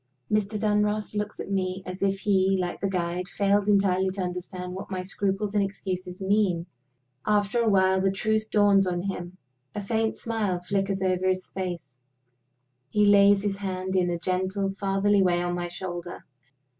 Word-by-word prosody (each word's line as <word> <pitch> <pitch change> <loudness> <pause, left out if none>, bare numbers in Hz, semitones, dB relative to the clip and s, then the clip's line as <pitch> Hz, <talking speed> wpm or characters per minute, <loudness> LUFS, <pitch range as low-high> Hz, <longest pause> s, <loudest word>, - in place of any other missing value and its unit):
Mr. 210 0 0
Dunross 210 0 +1
looks 210 0 -3
at - - -5
me, 190 -1 -1
as 185 +1 -7
if 195 0 0
he, 195 -1 +3
like 180 -1 -3
the 195 - 0
guide, 180 -1 -2
failed 200 0 +1
entirely 190 -2 +3
to 190 +1 -4
understand 180 0 -5
what 190 - -7
my 185 -2 -3
scruples 195 +2 -1
and 205 -1 +3
excuses 185 -2 -5
mean. 190 -3 +1 0.6
After 210 +2 +1
a 230 - +2
while 190 -1 +3
the 195 - +3
truth 215 +3 0
dawns 200 -2 +4
on 175 -1 -1
him. 185 -2 -5 0.4
A 205 - -3
faint 220 +2 0
smile 215 -6 -1
flickers 195 +1 -1
over 185 0 +1
his 185 0 -1
face; 170 -9 -5 0.9
he 210 +4 +3
lays 200 -1 +6
his 200 -1 -1
hand 190 -1 -3
in 180 -1 +2
a 175 - -1
gentle, 190 +2 -1
fatherly 195 +1 +2
way 180 -2 +3
on 175 0 -1
my 175 0 -2
shoulder. 175 0 -6
195 Hz, 170 wpm, -26 LUFS, 185-205 Hz, 0.9 s, lays